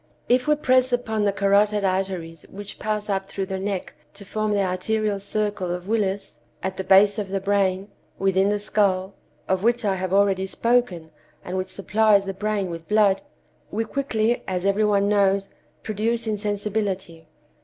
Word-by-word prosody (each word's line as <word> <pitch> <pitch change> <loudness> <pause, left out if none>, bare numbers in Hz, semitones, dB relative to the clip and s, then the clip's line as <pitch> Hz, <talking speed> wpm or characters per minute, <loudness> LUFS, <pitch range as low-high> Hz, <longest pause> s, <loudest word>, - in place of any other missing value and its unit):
If 250 +2 +2
we 300 - +4
press 255 -3 +2
upon 220 -4 0
the 200 - +3
carotid 200 +1 +2
arteries 185 -4 -2
which 205 +1 -8
pass 210 -1 -2
up 195 -1 -1
through 195 -1 -3
the 190 0 -4
neck 195 -1 -3 0.2
to 200 0 -10
form 215 +1 -2
the 200 -1 +2
arterial 200 +3 -1
circle 205 -2 -2
of 180 +1 -4
Willis, 205 -3 -1 0.2
at 190 0 -2
the 190 - -2
base 200 +2 +5
of 200 -2 -4
the 195 0 -1
brain, 195 -1 +1 0.3
within 195 0 +2
the 205 - +1
skull—of 190 -2 -1
which 235 +1 +1
I 200 - +2
have 185 0 -3
already 195 -1 +2
spoken, 195 -8 0 0.3
and 180 - -4
which 185 0 -2
supplies 205 +1 +2
the 195 - -3
brain 200 -2 -2
with 165 -1 -8
blood—we 215 +2 -1
quickly, 240 -3 0
as 185 0 -2
every 200 +2 +2
one 200 -1 +2
knows, 200 -1 +2 0.3
produce 225 +2 -1
insensibility. 205 -5 -3
200 Hz, 165 wpm, -23 LUFS, 190-215 Hz, 0.3 s, base